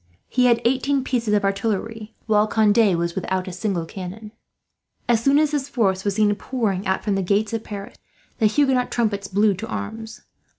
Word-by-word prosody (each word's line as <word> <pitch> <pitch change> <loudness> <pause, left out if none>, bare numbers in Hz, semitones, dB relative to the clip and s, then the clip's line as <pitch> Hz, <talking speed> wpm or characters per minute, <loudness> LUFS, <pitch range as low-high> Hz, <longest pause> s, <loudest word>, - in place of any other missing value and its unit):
He 250 -1 +2
had 235 -1 +3
eighteen 265 +2 +1
pieces 240 -4 -1
of 205 - +1
artillery, 215 +2 -2
while 215 -1 +3
Conde 215 -3 +3
was 170 0 -1
without 190 0 -2
a - - -4
single 185 -3 -2
cannon. 195 +5 -8 0.8
As 235 -1 +2
soon 275 +2 +4
as 305 -1 +3
this 285 -2 -2
force 195 -8 0
was 200 -2 -1
seen 210 -1 +3
pouring 205 -4 -2
out 190 - 0
from 205 - 0
the 195 - 0
gates 205 +4 0
of 225 -1 -2
Paris, 200 -1 -8 0.4
the 220 - +5
Huguenot 260 +1 +2
trumpets 205 -4 -1
blew 205 +2 +2
to 185 - -6
arms. 220 - -6
215 Hz, 185 wpm, -22 LUFS, 195-235 Hz, 0.8 s, the